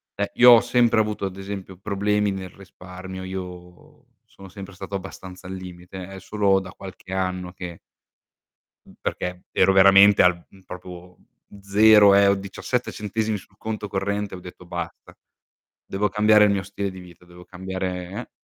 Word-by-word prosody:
Eh, - - -2
io 125 0 +8
ho 115 -1 +8
sempre 120 -2 +2
avuto 105 -2 -3
ad 95 -1 -5
esempio 95 -1 -7
problemi 105 +1 0
nel 95 -1 -6
risparmio, 95 0 -10
io 90 -2 -9 0.2
sono 95 - -15
sempre 100 +1 -10
stato 95 +1 -7
abbastanza 95 -1 -9
al 95 - -6
limite. 90 0 -9
È 95 0 -9
solo 100 0 +1
da 90 -1 -9
qualche 95 -1 -11
anno 90 -1 -2
che 90 -2 -8 1.1
Mh, - - -16
perché 90 0 -4
ero 95 - +4
veramente 100 +1 +7
al 90 -1 +2
mhmm, 95 - -19
proprio 90 -1 -11 0.4
0 105 0 +6
eh, 100 0 +6
ho 100 - +4
17 100 +5 -3
centesimi 105 +1 -2
sul 95 - -19
conto 110 -1 -5
corrente, 100 +1 -3
ho 90 - -8
detto: 90 0 -12
"Basta, 85 -1 -7 0.7
devo 105 +2 -1
cambiare 105 +1 +5
il 105 - +3
mio 100 -1 -1
stile 100 0 -4
di 95 - -11
vita, 90 -1 -15
devo 90 0 -15
cambiare, 95 -1 -5
eh" - - -12
95 Hz, 165 wpm, -23 LUFS, 90-100 Hz, 1.1 s, io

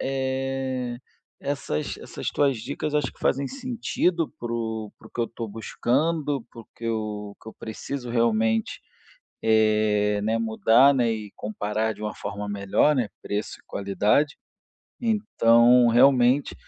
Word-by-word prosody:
eh, 130 -2 -2 0.4
essas 135 - -3
essas - - -6
tuas 140 -3 +2
dicas 145 +6 -4
acho 150 - +1
que - - -25
fazem 140 +1 +1
sentido 235 - -1
para 120 -1 -4
o 110 -2 -3
para 110 - -15
o - - -29
que - - -4
eu 115 - +3
estou 115 -1 -6
buscando, 140 +6 -1
para 115 - -11
o - - -15
que 115 - -10
eu 105 -2 -3
que 110 - -10
eu - - -9
preciso 125 +3 -6
realmente, 110 -1 +1 0.6
eh, 105 -1 +3
né, 110 +2 +1
mudar, 115 +4 +4
né, 120 -3 +2
e 105 -2 -5
comparar 110 +1 -2
de - - -11
uma 105 - -3
forma 100 0 -5
melhor, 100 +9 +2
né, 125 -6 0
preço 105 +1 -3
e - - -34
qualidade. 105 +9 +1 0.6
Então 125 - +4
realmente, 125 +2 +4
115 Hz, 150 wpm, -25 LUFS, 110-135 Hz, 0.6 s, mudar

